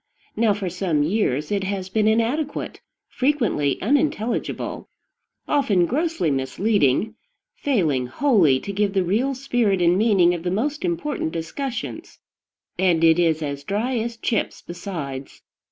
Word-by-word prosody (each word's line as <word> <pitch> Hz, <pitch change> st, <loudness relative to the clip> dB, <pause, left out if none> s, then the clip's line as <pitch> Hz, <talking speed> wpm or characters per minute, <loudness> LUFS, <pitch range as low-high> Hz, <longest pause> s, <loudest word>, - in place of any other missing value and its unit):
Now, 220 Hz, -2 st, +2 dB
for 200 Hz, -2 st, -4 dB
some 175 Hz, -4 st, 0 dB
years 150 Hz, -, 0 dB
it 200 Hz, -2 st, 0 dB
has 190 Hz, -1 st, -3 dB
been 215 Hz, +2 st, +1 dB
inadequate, 240 Hz, +7 st, -1 dB, 0.3 s
frequently 240 Hz, -, 0 dB
unintelligible, 260 Hz, -2 st, -1 dB, 0.6 s
often 220 Hz, -12 st, +2 dB
grossly 290 Hz, -, 0 dB
misleading, 145 Hz, -, +1 dB, 0.4 s
failing 160 Hz, -, 0 dB
wholly 170 Hz, -, +3 dB
to 200 Hz, -, -5 dB
give 200 Hz, 0 st, 0 dB
the 190 Hz, -, +3 dB
real 235 Hz, +10 st, 0 dB
spirit 245 Hz, -7 st, +1 dB
and 175 Hz, +1 st, +3 dB
meaning 195 Hz, -6 st, +4 dB
of 175 Hz, -, -4 dB
the 180 Hz, -, -2 dB
most 280 Hz, +11 st, -1 dB
important 300 Hz, -, -2 dB
discussions; 235 Hz, -, -5 dB, 0.6 s
and 175 Hz, -3 st, +3 dB
it 165 Hz, +1 st, +5 dB
is 160 Hz, -2 st, +2 dB
as 140 Hz, -1 st, -4 dB
dry 220 Hz, -, -1 dB
as 230 Hz, +1 st, -4 dB
chips 225 Hz, -2 st, -2 dB
besides. 160 Hz, -7 st, -7 dB
200 Hz, 135 wpm, -23 LUFS, 165-235 Hz, 0.6 s, it